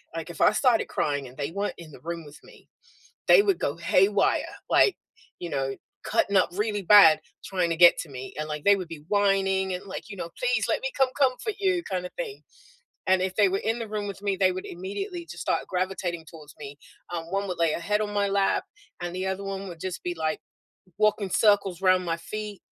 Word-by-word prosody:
like, 165 +1 -5
if 165 - -8
I - - +6
started 240 -2 +3
crying 145 -2 -1
and 125 +1 -15
they 145 +3 -3
weren't 200 +2 -3
in 165 -3 -11
the - - -13
room 170 -1 -5
with 145 0 -13
me, - - -18 0.6
they 470 - +8
would 395 -4 +1
go 145 +3 -2
haywire, 195 +4 +3 0.3
like, 400 - +5 0.4
you 175 - -5
know, 135 -1 -1 0.3
cutting 200 - +1
up 185 - +3
really 205 0 -1
bad 170 -6 +8 0.2
trying 180 -3 -1
to 165 - 0
get 175 0 +7
to 160 - -5
me, 130 -1 -8
and, 155 0 -3
like, 150 -1 -4
they 200 0 +6
would 185 -3 -5
be 160 -3 -9
whining 195 -2 +2
and, 180 - -6
like, 195 +2 -7
you 200 - -8
know, 170 - -5
"Please, - - +1
let - - 0
me - - -1
come 265 -1 +4
comfort 275 - +1
you," 375 -3 +1
kinda 180 -2 -3
thing. 440 -4 -5 0.6
And 190 0 +4
if 185 0 -2
they 205 -2 +5
were 195 - 0
in 225 +3 -1
the 230 -2 -5
room 210 -1 -3
with 200 0 -7
me, 200 -1 0
they 185 -1 +3
would 185 +1 -6
immediately 340 - -6
just - - -8
start - - -1
gravitating 180 -3 -3
towards 155 -3 -13
me. 145 -1 -9 0.3
Um, 165 -1 -5
one 195 +1 -1
would 180 - -4
lay 165 -2 +2
a - - -3
head 210 +5 0
on 210 -1 -2
my 205 -1 +1
lap, 195 - +1 0.4
and 175 0 -4
the 185 +1 -3
other 190 +1 -3
one 195 0 -5
would 170 -2 -10
just 185 0 -5
be, 175 - -3
like, 160 -1 -2 0.6
walking 210 -2 +2
circles 200 -3 +2
'round 185 -1 +3
my 165 -1 -1
feet. 210 +2 -7
190 Hz, 225 wpm, -26 LUFS, 170-205 Hz, 0.6 s, they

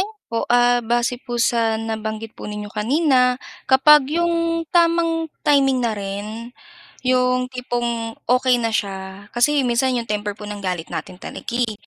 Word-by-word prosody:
Opo, 400 - -4
ah, 245 0 +4
base 240 +1 0
po 240 -2 -5
sa 230 -2 +2
nabanggit 220 0 -4
po - - -9
ninyo 210 0 -6
kanina, 250 +2 +2 0.3
kapag 270 +1 +6
yung 335 -1 0
tamang 335 -1 +2 0.2
timing 270 -3 +3
na 230 - +1
rin, 210 +3 -5 0.6
yung 255 0 +2
tipong 240 -2 -3 0.2
okey 250 0 +3
na 230 - 0
siya 195 -2 -4
kasi 280 +4 +2
minsan 250 +1 +1
yung 235 -1 -3
temper 210 -1 -2
po 210 - -11
ng 205 0 -6
galit 180 -4 -4
natin 165 +1 -5
talaga, 235 +5 -7
eh. 240 -3 0
240 Hz, 150 wpm, -21 LUFS, 215-265 Hz, 0.6 s, kapag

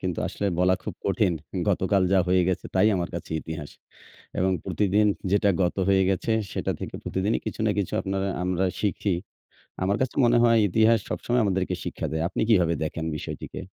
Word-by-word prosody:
কিন্তু 90 -3 -3
আসলে 100 - -3
বলা 90 +1 +4
খুব - - -5
কঠিন। 90 - +2 0.4
গতকাল 95 0 +2
যা 95 - +5
হয়ে 90 0 +4
গেছে 90 0 -2
তাই 95 +3 +5
আমার 85 -1 -2
কাছে 85 - -6
ইতিহাস 80 -2 -7 0.7
এবং 95 +1 +2
প্রতিদিন 100 +3 +2 0.3
যেটা 100 0 +3
গত 90 - 0
হয়ে 95 -1 +4
গেছে 95 +4 0 0.2
সেটা - - -1
থেকে - - -6
প্রতিদিনই 100 +4 0
কিছু - - -4
না - - +3
কিছু 100 - -1
আপনারা 95 0 -2 0.2
আমরা 90 +1 0 0.2
শিখি। 100 -1 0 0.7
আমার 100 +2 +2
কাছে 130 -1 -1
মনে 120 0 +4
হয় 115 -1 +5
ইতিহাস 110 +4 +4
সবসময় 120 0 0
আমাদেরকে 95 -2 0
শিক্ষা - - -4
দেয়। 80 0 -1
আপনি - - -3
কিভাবে 90 -7 +4
দেখেন 80 +1 -3
বিষয়টিকে? - - -7
95 Hz, 180 wpm, -25 LUFS, 90-105 Hz, 0.7 s, যা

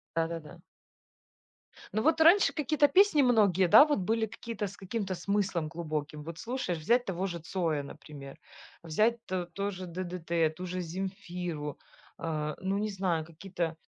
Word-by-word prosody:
Да-да-да. 165 -2 -3 1.3
Ну, 215 - +1
вот 320 +2 +3
раньше 350 +5 +6
какие-то 300 -1 +3
песни 350 0 +5
многие, 205 - +4
да, 280 - +9
вот 295 -7 0
были 220 +4 +1
какие-то 220 -1 -5
с 200 - -11
каким-то 195 0 -3
смыслом 185 -2 -1
глубоким. 155 -2 -4
Вот 165 +2 -8
слушаешь, 230 -8 -3
взять 240 +11 +3
того 190 -2 -2
же 170 -2 -5
Цоя, 160 -2 -1
например, 140 -1 -11 0.4
взять 215 +9 +2
т 185 -1 -2
тоже 195 -2 -4
"ДДТ", 170 -2 -1
ту 180 - -6
же 185 0 -4
Земфиру, 180 -4 -5 0.4
а, 155 -2 -3
ну, 190 +1 0
не 215 +1 -1
знаю, 185 -5 -1
какие-то 170 0 -4
185 Hz, 145 wpm, -30 LUFS, 165-210 Hz, 1.3 s, да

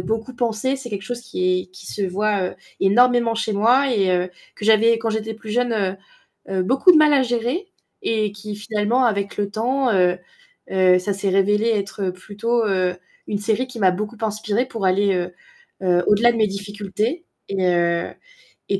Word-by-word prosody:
beaucoup 225 +3 -3
penser, 240 +2 -1
c'est 260 -3 -9
quelque 200 -2 -4
chose 240 +3 -5
qui 185 -6 0
est - - -16
qui 185 0 -13
se 205 - -4
voit 195 0 -1 0.3
énormément 235 +3 +4
chez 220 -1 -1
moi 245 +7 +3
et 195 -5 +2
heu, 180 0 0 0.3
que 210 - -7
j'avais 225 +1 +4
quand 225 0 -2
j'étais 220 0 -3
plus 220 0 -10
jeune, 245 +2 +1 0.8
heu, 190 -1 0
beaucoup 265 - +5
de 335 - +5
mal 305 -1 +5
à 275 -2 +4
gérer 245 - -2 0.4
et 215 - 0
qui 205 +1 -8
finalement 215 +4 0
avec 200 -3 -1
le 205 -1 -1
temps, 250 +4 0
heu 180 -1 +3 0.5
heu 185 -1 +4
ça 200 +3 -2
s'est 195 0 -2
révélé 205 +4 +2
être 200 -3 -1
plutôt, 220 +5 -2
heu, 185 -3 0 0.3
une 205 - -2
série 220 +4 0
qui 250 -2 -9
m'a 190 -3 +4
beaucoup 210 +5 -5
inspirée 215 +2 -1
pour 225 -6 -4
aller, 195 +1 +2
heu 180 0 -3 0.5
heu 180 -1 +2
au-delà 225 +4 +5
de 230 - -4
mes 215 -1 +3
difficultés 205 - -4 0.2
et 195 -2 -1
heu 170 -1 +1 0.6
et 195 - +1
210 Hz, 185 wpm, -21 LUFS, 195-235 Hz, 0.8 s, beaucoup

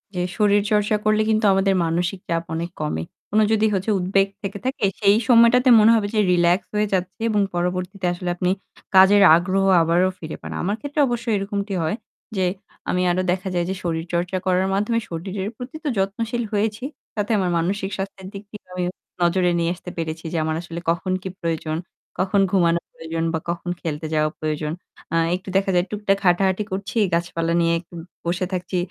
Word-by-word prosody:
যে, 180 - -1 0.2
শরীরচর্চা 210 0 +3
করলে 215 0 +3
কিন্তু 215 0 +2
আমাদের 195 0 +2
মানসিক 175 +3 -1
চাপ 165 0 0
অনেক 170 +2 -3
কমে। 80 - -2 0.3
কোনো 215 +1 +4
যদি 220 0 +3
হচ্ছে 195 +3 0
উদ্বেগ 195 +2 +2
থেকে 200 -1 -4
থাকে, 260 -3 -2 0.2
সেই 200 0 +5
সময়টাতে 245 +1 +6
মনে 215 +1 +6
হবে 215 -2 +1
যে - - +3
রিল্যাক্স 175 +2 +3
হয়ে 210 0 +2
যাচ্ছে 185 +3 -2
এবং 210 -2 +2
পরবর্তীতে 180 +2 -2
আসলে 175 0 -4
আপনি 180 0 0 0.5
কাজের 195 +2 +7
আগ্রহ 190 +3 +1 0.2
আবারও 170 +3 +3
ফিরে 155 -1 -6
পান। - - -7
আমার 200 +4 0
ক্ষেত্রে 290 +1 -4
অবশ্যই 235 -2 -1
এরকমটি 200 0 -3
হয় 160 - 0 0.4
যে, 190 - +2 0.4
আমি 180 - +1
আরো 180 +1 +1
দেখা 185 +1 -2
যায় 175 -1 +1
যে 190 - -1
শরীরচর্চা 170 +2 -2
করার 185 0 +2
মাধ্যমে 210 +4 +1
শরীরের 190 +4 -4
প্রতি 250 +4 -8
তো - - -3
যত্নশীল 225 +5 -1
হয়েছি। 210 +2 -1 0.3
তাতে 210 +1 -1
আমার 185 -3 +1
মানসিক 195 +4 -1
স্বাস্থ্যের 190 -1 -6
দিক 200 0 -7
দিয়ে 210 - -10
আমি 180 0 -2 0.4
নজরে 175 +1 +3
নিয়ে 170 0 +1
আসতে 180 - -9
পেরেছি 160 0 -4
যে, - - 0
আমার 155 0 -1
আসলে 170 -1 -7
কখন 175 +3 0
কি 190 - -5
প্রয়োজন, 160 -2 -2 0.4
কখন 195 +2 +2
ঘুমানোর 170 -3 +2
প্রয়োজন 165 0 -4
বা 160 - 0
কখন 175 +1 -3
খেলতে 155 -1 -3
যাওয়া 155 0 +2
প্রয়োজন। 155 -1 -2 0.4
আহ 165 0 +3
একটু 185 +1 -8
দেখা 195 0 +1
যায় 175 0 +3
টুকটাক 205 -2 0
হাঁটাহাঁটি 190 +3 +3
করছি। 195 +4 -4 0.2
গাছপালা 170 -1 0
নিয়ে 165 0 +2
একটু 175 +1 -18 0.3
বসে 175 +2 0
থাকছি। 180 0 -2
185 Hz, 185 wpm, -22 LUFS, 170-205 Hz, 0.5 s, কাজের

